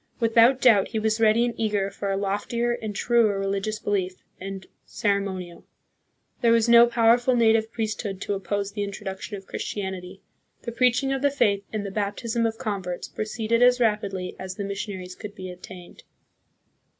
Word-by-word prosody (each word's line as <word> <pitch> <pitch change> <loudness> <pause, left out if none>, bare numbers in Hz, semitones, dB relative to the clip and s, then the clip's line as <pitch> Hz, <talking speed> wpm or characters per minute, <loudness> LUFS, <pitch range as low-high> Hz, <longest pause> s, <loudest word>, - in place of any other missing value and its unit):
Without 230 +2 +4
doubt 220 -7 +5
he - - -4
was 220 +1 0
ready 225 +2 +4
and 240 - -2
eager 205 -3 0
for 200 0 -4
a 195 - 0
loftier 205 +4 -1
and 220 -3 -4
truer 225 -2 +2
religious 195 +2 -2
belief 195 -4 -1 0.2
and 195 0 -7 0.2
ceremo 200 -2 -1
nial. 175 -2 -9 0.8
There 235 - +4
was 230 0 +3
no 235 0 +8
powerful 240 +2 +3
native 225 -1 +3
priesthood 215 -4 -3
to - - -2
oppose 200 0 -2
the 205 0 -4
introduction 200 0 -6
of 195 - -12
Christianity. 190 -2 -5 0.4
The 235 - -4
preaching 250 +3 +2
of 270 - -2
the 285 - +3
faith 205 -8 +1
and 215 -2 -3
the 200 - -5
baptism 220 +3 -1
of 225 0 -4
converts 190 -5 -4
proceeded 225 +2 -1
as 250 0 +5
rapidly 200 -5 -1
as 185 0 -6
the 205 - -4
missionaries 195 -2 -5
could 210 +1 -9
be 185 -2 -7
obtained. 180 0 -12
210 Hz, 170 wpm, -25 LUFS, 195-230 Hz, 0.8 s, no